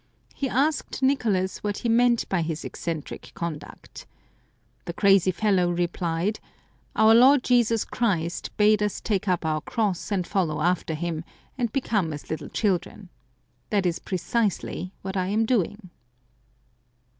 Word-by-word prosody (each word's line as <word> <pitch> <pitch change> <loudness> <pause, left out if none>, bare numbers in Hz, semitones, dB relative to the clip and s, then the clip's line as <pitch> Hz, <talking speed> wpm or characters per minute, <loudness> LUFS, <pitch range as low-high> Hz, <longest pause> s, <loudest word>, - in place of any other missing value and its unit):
He 275 - -2
asked 275 +1 0
Nicolas 215 -9 +1
what 205 -1 -3
he - - +3
meant 235 +1 +3
by 185 -3 0
his 160 0 -3
eccentric 165 -3 -5
conduct. 165 -3 -7 0.8
The 170 - -4
crazy 195 -1 +4
fellow 185 -2 +2
replied, 175 +2 -1 0.3
" - - -37
Our 220 +1 +6
Lord 260 +3 +6
Jesus 235 -3 +2
Christ 175 -7 -1
bade 210 0 +4
us 210 -1 -1
take 205 -2 -1
up 180 -3 0
our 155 -1 0
cross 205 -1 -2
and 190 -3 0
follow 175 -7 -1
after 170 -1 0
Him, 165 0 -3 0.3
and 240 -4 -1
become 205 - 0
as 145 - -8
little 160 - -4
children. 190 -1 -2 0.6
That 200 -3 +1
is 175 -1 0
precisely 185 -1 -2
what 190 0 -5
I 185 -1 0
am 215 +3 +1
doing." 205 -4 -1
195 Hz, 145 wpm, -25 LUFS, 175-225 Hz, 0.8 s, Our